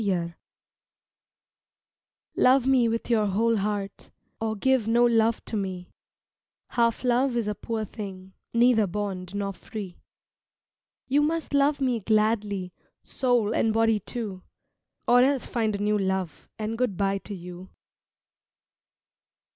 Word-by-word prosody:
SONG 175 -4 -1 2.0
Love 255 0 +4
me 260 -3 +4
with 230 0 -2
your 220 -3 +2
whole 225 +4 +2
heart 200 -1 -3 0.3
Or 220 -1 -1
give 255 +1 +1
no 235 +2 +4
love 230 -1 +2
to - - -4
me, 185 -3 -4 0.8
Half 235 -1 +1
love 250 0 +2
is 230 -3 -1
a 210 - 0
poor 220 +1 -4
thing, 190 -3 -8 0.2
Neither 235 -3 +4
bond 190 -1 -4
nor 200 -1 -2
free. 190 -1 -8 1.1
You 280 +3 +2
must 320 +1 -1
love 285 +1 +3
me 255 -4 +1
gladly 210 -3 0 0.3
Soul 245 -5 +1
and 225 - +2
body 225 -1 +2
too, 205 -3 -6 0.7
Or 245 +1 +6
else 270 0 +2
find 220 -3 -1
a 200 - -3
new 210 0 +2
love, 190 -4 -3
And 220 +1 -4
good 245 -8 0
by 195 0 0
to 205 - -8
you. 180 +1 -10
220 Hz, 130 wpm, -26 LUFS, 195-240 Hz, 2.0 s, Or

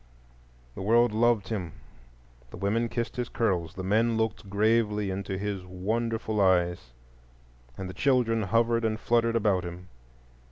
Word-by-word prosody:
The - - -8
world 115 +3 +4
loved 115 -1 +2
him; 95 -8 -4 0.8
the - - -10
women 115 +4 0
kissed 120 +1 -3
his 125 -1 -2
curls, 90 -8 -1
the 95 - -5
men 110 +4 +2
looked 110 -2 -2
gravely 105 -1 +1
into 95 0 -4
his 100 -1 -3
wonderful 110 +4 -2
eyes, 90 -7 +2 0.9
and 95 - -5
the 90 - -7
children 125 -4 +2
hovered 115 +3 +1
and 110 -1 0
fluttered 115 -1 +1
about 100 -5 +2
him. 90 +1 -8
105 Hz, 145 wpm, -27 LUFS, 95-115 Hz, 0.9 s, world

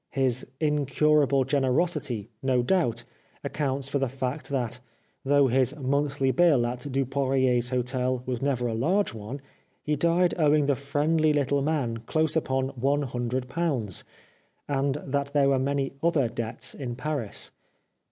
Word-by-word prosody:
His 130 -2 0
incurable 150 -1 +2
generosity, 135 - 0
no 130 -2 +2
doubt, 120 -8 +1 0.4
accounts 140 -2 -1
for 140 0 -1
the 135 -2 0
fact 130 +3 -4
that, 125 -3 -2 0.4
though 140 +1 +4
his 130 +1 +2
monthly 140 -1 0
bill 145 -4 +4
at 125 +3 -4
Dupoirier's 130 -2 +1
hotel 125 0 -1
was 125 -2 -3
never 135 -3 0
a 115 - -1
large 175 - +1
one, 115 +6 -7 0.4
he 150 - 0
died 170 +4 +2
owing 150 -1 +4
the 140 -1 +2
friendly 150 +3 +1
little 140 -1 +1
man 135 -6 0
close 155 +7 0
upon 130 -4 0
one 140 +2 0
hundred 125 0 -3
pounds, 130 - -2 0.6
and 140 -1 0
that 140 +1 -2
there 140 -2 +4
were 135 -1 +3
many 135 0 -1
other 160 -6 +2
debts 115 +3 -4
in 125 -4 -5
Paris. 135 -5 -4
135 Hz, 140 wpm, -27 LUFS, 125-145 Hz, 0.6 s, though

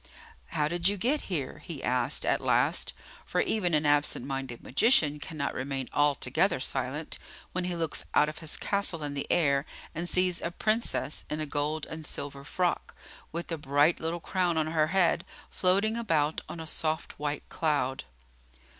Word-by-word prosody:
"How 150 -1 0
did 175 +2 +1
you 205 - -1
get 265 +10 +1
here?" 155 -3 -2
he 155 -2 -7
asked 125 +2 +1
at - - +2
last; - - +2 0.3
for - - -1
even 180 -7 +1
an 150 0 +2
absent 145 -3 +3
minded 135 -3 -4
magician 150 - +4
cannot 150 -1 -3
remain 135 0 -3
altogether 145 -2 +2
silent, - - -3 0.3
when 185 0 -2
he 180 -1 -1
looks 165 -2 0
out 150 - +6
of 150 - -6
his 160 -2 -3
castle 200 -6 -1
in 145 -1 -3
the 140 - -3
air 140 -5 +3 0.3
and 170 +2 -3
sees 180 -1 +2
a - - -1
Princess 215 -4 0
in 150 - -2
a 155 - 0
gold 150 +1 -1
and 160 0 -7
silver 140 -2 -4
frock, 175 +4 -1 0.4
with 170 +1 -4
a 165 - -2
bright 145 +3 +3
little 165 +2 -2
crown 175 -1 0
on 155 - +2
her 155 -1 +2
head, 180 -1 +3 0.3
floating 200 +4 +2
about 160 -10 +1
on 170 - -6
a 160 - -5
soft 160 -1 -2
white 145 0 -3
cloud. 145 -5 0
155 Hz, 170 wpm, -29 LUFS, 145-175 Hz, 0.4 s, out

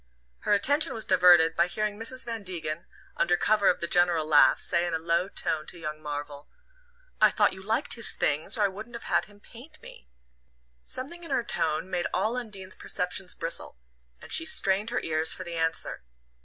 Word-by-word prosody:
Her - - 0
attention 285 +10 +2
was 220 - -5
diverted 175 -3 +5
by - - +3
hearing 210 +2 -3
Mrs. 255 +3 -3
Van 230 -2 -4
Degen, 170 -4 -5 0.3
under 175 - +2
cover 210 0 +3
of - - 0
the - - -1
general 175 -3 +3
laugh, 150 -1 +5
say 170 +1 0
in 170 - -2
a - - +1
low 170 +3 0
tone 155 -5 -2
to - - -8
young 155 -2 -6
Marvell: 145 -1 -7 0.7
"I - - +7
thought - - +2
you 190 - -9
liked 215 +4 -1
his 230 - +4
things, 155 - 0
or 210 - +2
I - - +4
wouldn't 215 +5 -9
have 235 - -7
had - - +1
him 205 -1 -19
paint 260 +9 -14
me." - - -14 0.7
Something 340 +7 -4
in 335 - -9
her 260 -3 0
tone 165 -7 -1
made 180 -2 -2
all 215 +6 0
Undine's 200 -6 -6
perceptions 180 +1 -3
bristle, 165 - -3 0.4
and - - -13
she - - +4
strained 205 -8 +1
her 245 - -1
ears 160 0 +1
for 185 - -7
the 170 -2 -7
answer. 165 - -1
185 Hz, 195 wpm, -27 LUFS, 165-220 Hz, 0.7 s, I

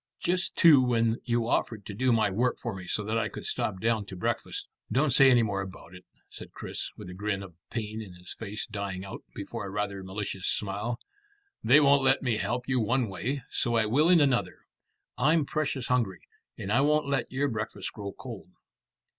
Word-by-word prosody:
Just 180 +1 -1
too 155 -6 +7
when 115 -2 +1
you'd 120 -2 +1
offered 110 -3 0
to 105 - -6
do 125 +5 +1
my 110 -3 +3
work 120 +6 +1
for 120 - -4
me 95 -2 -8
so 105 - -1
that 110 +2 0
I - - -1
could - - -8
stop 95 -3 -1
down 115 0 +1
to 95 - -7
breakfast." 90 - -2 0.3
"Don't 140 +2 +3
say 135 +2 +8
any 120 -2 +5
more 100 -3 -1
about 95 -2 -9
it," 90 0 -13 0.2
said - - -11
Chris, - - -5
with - - -9
a 90 - -8
grin 100 +1 -2
of 95 -3 -11 0.2
pain 110 -1 -4
in 95 -5 -10
his 90 0 -9
face 105 -1 -5
dying 100 -3 -4
out 95 - -7
before - - -5
a - - -6
rather 100 -1 -3
malicious 95 0 -4
smile. 105 +4 -1 0.6
"They 130 +6 +7
won't 140 -1 +5
let 135 +1 +3
me 120 -4 +1
help 120 +5 -2
you 130 -1 +2
one 120 +1 +1
way, 120 +9 -3
so 120 -2 0
I 115 -1 +3
will 145 +10 +3
in 180 -2 +7
another. 135 -4 +1 0.5
I'm 150 +4 +4
precious 140 -4 -2
hungry, 115 -7 0 0.4
and 95 - -4
I 120 +5 +4
won't 150 +1 +3
let 135 -3 -1
your 135 +3 +1
breakfast 110 -4 -4
grow 100 -2 -6
cold." 115 -4 -9
115 Hz, 205 wpm, -28 LUFS, 100-130 Hz, 0.6 s, say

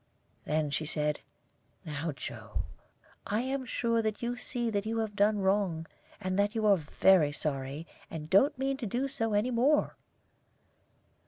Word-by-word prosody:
Then 150 -1 0
she 155 +2 -1
said, 150 -1 +1 1.0
"Joe, 125 - -5 0.6
I 210 +3 +1
am 260 +1 -2
sure 230 -1 +1
that 215 +1 -2
you 240 +1 -1
see 240 -2 -3
that 200 -1 0
you 225 +1 -1
have 220 -2 -2
done 210 +1 +3
wrong, 190 -4 +1 0.3
and 185 -1 -1
that 205 +2 +2
you 220 -1 0
are 200 -2 +6
very 160 0 +4
sorry, 140 +1 -3 0.2
and 155 -2 -6
don't 260 - +4
mean 270 +1 -1
to 245 -5 -4
do 250 +7 -1
so 225 -5 -2
any 220 +5 +2
more." 265 +6 +3
205 Hz, 155 wpm, -30 LUFS, 160-235 Hz, 1.0 s, are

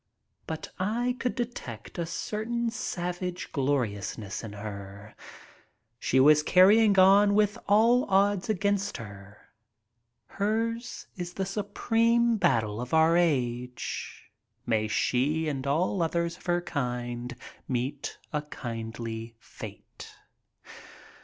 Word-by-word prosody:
But 160 -1 -5
I 235 +6 0
could 250 - -1
detect 225 - -6
a 170 - -1
certain 230 +6 -2
savage 180 -4 -4
gloriousness 110 -8 -2
in 110 -2 -7
her. 100 0 -8 0.8
She 130 - +2
was 150 +3 +7
carrying 200 +5 +5
on 200 +2 +6
with 210 -1 +2
all 230 +5 +5
odds 200 +2 +2
against 200 0 0
her. 100 -2 -10 0.9
Hers 225 - -2
is 175 -1 -5
the 190 - -1
supreme 225 +4 +1
battle 110 - +1
of 125 +5 -2
our 160 +1 +5
age. 125 -12 -1 0.3
May 110 -2 +1
she 145 +8 +1
and 140 -2 -3
all 175 +6 +1
others 170 0 0
of 180 - -17
her 175 0 +2
kind 125 -5 -3 0.3
meet 130 +3 -3 0.2
a 150 - 0
kindly 115 -4 -6
fate. - - -11
165 Hz, 110 wpm, -28 LUFS, 120-205 Hz, 0.9 s, was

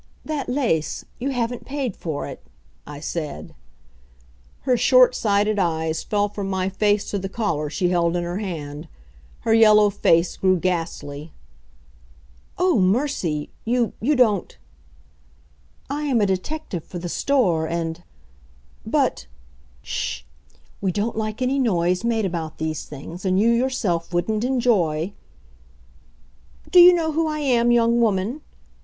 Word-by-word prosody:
"That 305 -4 -3
lace. 245 - -1
You 265 +3 -2
haven't 245 -2 -2
paid 270 -6 -3
for 155 -4 -4
it," - - -8 0.5
I 145 -1 -8
said. 155 -1 -5 1.1
Her 255 -2 +2
short 250 +1 +5
sighted 210 -1 +1
eyes 160 -3 0
fell 205 -1 0
from 200 -1 -5
my 190 -1 -1
face 205 +1 +1
to 200 - -1
the 195 0 -5
collar 165 -9 -2
she 175 +5 0
held 170 -1 +1
in 175 - -1
her 175 +3 -3
hand. 155 -6 -6 0.5
Her 225 - +1
yellow 215 -2 +6
face 170 -3 +2
grew 185 -1 +3
ghastly. 165 -4 -3 1.2
"Oh, 360 - +3
mercy! 185 - 0
You 240 0 0
you 290 +7 +2
don't 225 -6 +2 0.7
" - - -34
"I 290 +2 -3
am 265 -5 +2
a 205 - +3
detective 190 - -3
for 180 - -8
the 175 +1 -5
store, 175 - +1
and 165 0 -3 0.4
" 60 0 -31 0.4
"But - - 0 0.3
" - - -30
"Sh! - - -4 0.6
We 190 -2 0
don't 210 +5 -2
like 215 +2 -3
any 265 +2 +1
noise 180 -6 +1
made 230 -2 +1
about 165 -3 -4
these 155 -1 -3
things, 150 +5 -9
and 185 -1 +1
you 225 +3 +4
yourself 235 -9 0
wouldn't 215 +5 0
enjoy 200 -10 +1 0.7
" 60 0 -29
"Do 360 - +7
you 355 +1 +10
know 330 -3 +1
who 320 +1 0
I 305 -1 -2
am, 245 -5 +2
young 235 0 +3
woman?" 220 +5 0
200 Hz, 150 wpm, -22 LUFS, 165-240 Hz, 1.2 s, you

